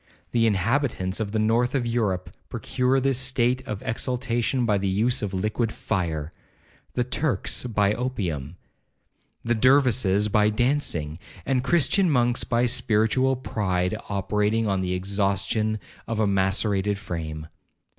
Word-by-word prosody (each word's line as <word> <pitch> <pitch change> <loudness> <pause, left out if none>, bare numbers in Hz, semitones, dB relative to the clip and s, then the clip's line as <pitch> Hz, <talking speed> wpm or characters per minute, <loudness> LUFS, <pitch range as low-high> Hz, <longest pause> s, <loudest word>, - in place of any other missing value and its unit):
The 115 -1 +3
inhabitants 105 -1 0
of 105 -2 -2
the 110 - -1
north 115 +4 +1
of 125 -3 0
Europe 105 -6 -1 0.2
procure 130 +1 0
this 135 -1 +1
state 130 -1 +1
of 105 +2 -5
exaltation 125 0 -1
by 105 -3 +2
the 100 - -1
use 115 +7 +1
of 105 -3 -2
liquid 105 +4 -1
fire—the 85 +6 -5
Turks 130 +1 -1
by 105 -4 +1
opium—the 90 - -3 1.0
Dervises 120 -5 +3
by 105 0 +3
dancing—and 105 - -1
Christian 175 +5 +3
monks 120 -4 +2
by 120 0 +1
spiritual 115 +3 +2
pride 95 -7 -1
operating 105 +2 0
on 95 -2 0
the 90 0 -1
exhaustion 100 +3 0 0.3
of 115 -1 -2
a 110 - +3
macerated 100 +1 +1
frame. 80 -6 -5
110 Hz, 125 wpm, -25 LUFS, 95-125 Hz, 1.0 s, The